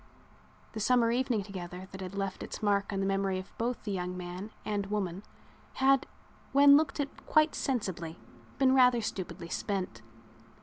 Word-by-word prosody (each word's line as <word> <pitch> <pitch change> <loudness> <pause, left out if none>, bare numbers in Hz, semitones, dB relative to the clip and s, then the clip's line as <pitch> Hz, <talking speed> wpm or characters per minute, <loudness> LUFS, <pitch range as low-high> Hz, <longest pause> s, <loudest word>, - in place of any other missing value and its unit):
The 220 - -4
summer 230 +1 +3
evening 245 -3 +1
together 185 -2 -7
that 190 - -8
had 185 +1 -6
left 195 -1 -3
its - - -7
mark 200 -1 +2
on 195 -1 -1
the - - 0
memory 195 -1 0
of 185 +1 -8
both 240 +1 -1
the 210 - -3
young 180 -1 -3
man 180 +3 -6 0.2
and 205 -2 -1
woman 195 -3 -2 0.5
had, 270 0 +3 0.5
when 280 +1 +8
looked 300 0 +2
at 280 -1 -4
quite 310 0 +4
sensibly, 185 -10 -2 0.4
been 265 -1 +4
rather 250 -2 +5
stupidly 190 -5 -5
spent. 185 - -3
200 Hz, 165 wpm, -31 LUFS, 185-250 Hz, 0.5 s, when